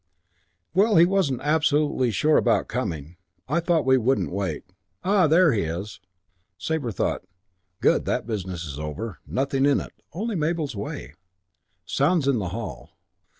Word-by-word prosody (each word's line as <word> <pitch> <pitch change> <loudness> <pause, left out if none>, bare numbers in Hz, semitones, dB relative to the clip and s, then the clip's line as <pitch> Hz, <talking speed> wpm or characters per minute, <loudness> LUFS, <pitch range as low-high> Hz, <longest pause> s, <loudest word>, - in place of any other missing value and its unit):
"Well, 205 +4 +4
he 165 - +8
wasn't 175 -9 +1
absolutely 150 -4 +2
sure 150 +8 +3
about - - +2
coming. 80 +2 -4 0.3
I 150 +6 +1
thought 170 -4 +1
we 130 0 +5
wouldn't 130 +3 +1
wait. 100 +1 -3 0.4
Ah, 190 -3 +4
there 165 +1 +5
he 105 - +1
is." 85 +6 -4 0.6
Sabre 160 -2 -2
thought, - - -1 0.6
"Good. - - +3
That - - -1
business 95 -6 -4
is 70 -2 -7
over. 85 +8 -5
Nothing 135 +1 0
in 145 - +3
it. - - -8 0.2
Only 215 +6 -3
Mabel's 155 -4 -1
way." 100 -7 -6 0.7
Sounds 145 - +1
in 135 -4 +3
the 90 -4 -3
hall. 105 +1 -7
135 Hz, 150 wpm, -25 LUFS, 100-160 Hz, 0.7 s, he